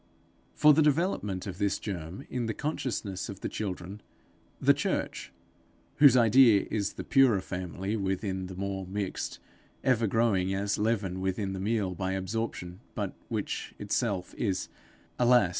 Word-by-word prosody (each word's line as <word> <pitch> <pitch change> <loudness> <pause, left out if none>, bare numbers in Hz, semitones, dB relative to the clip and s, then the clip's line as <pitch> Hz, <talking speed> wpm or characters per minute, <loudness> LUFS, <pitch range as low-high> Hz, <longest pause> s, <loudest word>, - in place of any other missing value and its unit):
For 150 0 +7
the 155 - +4
development 145 - +1
of 95 -2 -6
this 100 -1 +1
germ 90 -3 -6
in 120 -2 -1
the 110 - -2
consciousness 120 -10 -3
of 100 -1 -8
the - - -2
children, 95 0 -5 0.6
the - - +5
church - - -2 0.7
whose 140 -4 +8
idea 115 -2 +6
is 100 -2 -1
the - - -6
purer 130 -7 +4
family 95 +2 -4
within 95 -2 -2
the 95 - -8
more 95 0 -3
mixed, 100 0 -3 0.5
ever 120 -4 +3
growing 95 -4 +2
as 100 +1 -1
leaven 105 -4 0
within 95 +1 -1
the 95 - -4
meal 100 -2 0
by 95 +1 -2
absorption, 95 -2 -3 0.2
but - - -2 0.2
which - - -3
itself 100 -6 -1
is, 95 -4 -1 0.5
alas! 120 -5 +5
100 Hz, 145 wpm, -29 LUFS, 95-115 Hz, 0.7 s, whose